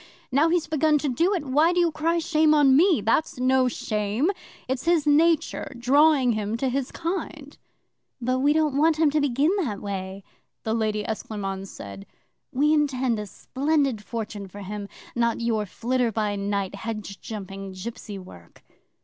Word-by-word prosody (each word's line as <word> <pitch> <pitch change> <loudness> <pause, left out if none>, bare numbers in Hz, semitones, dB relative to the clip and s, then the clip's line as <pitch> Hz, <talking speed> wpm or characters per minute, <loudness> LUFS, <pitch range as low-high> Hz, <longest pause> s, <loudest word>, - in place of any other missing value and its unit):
"Now 290 +5 +4
he's 340 -1 +1
begun 310 0 +2
to 290 0 -1
do 340 +11 +2
it, 335 - -3
why 300 +6 +3
do 355 - +1
you 340 -2 +3
cry 325 +2 0
shame 315 -2 +3
on 280 -3 +5
me? 330 - +4
That's 255 +7 +1
no 255 0 +3
shame. 215 - -1 0.4
It's 260 +2 -2
his 335 -3 +3
nature 315 +2 +2
drawing 270 +1 +4
him 215 0 -2
to 265 +2 0
his 265 +1 -2
kind." 320 -4 -5 0.6
'"But 255 +1 0
we 285 +2 +3
don't 305 -2 +2
want 315 +1 +3
him 310 -2 +3
to 305 +1 +1
begin 285 +3 +2
that 240 - -2
way," 195 -1 -5 0.4
the 220 - -1
Lady 215 -2 0
Esclairmonde 195 -3 -4
said. 100 - -10 0.4
"We 295 +4 +2
intend 260 -6 +1
a 210 - -5
splendid 275 -1 -1
fortune 210 -2 -5
for 205 +2 -10
him 200 +1 -6 0.3
not 235 -1 +1
your 225 -3 0
flitter 240 +3 0
by 210 -1 -1
night, 200 -1 -2
hedge 210 -1 -6
jumping, 195 -2 -7
gipsy 205 +1 -7
work." 135 - -14
255 Hz, 165 wpm, -25 LUFS, 210-300 Hz, 0.6 s, on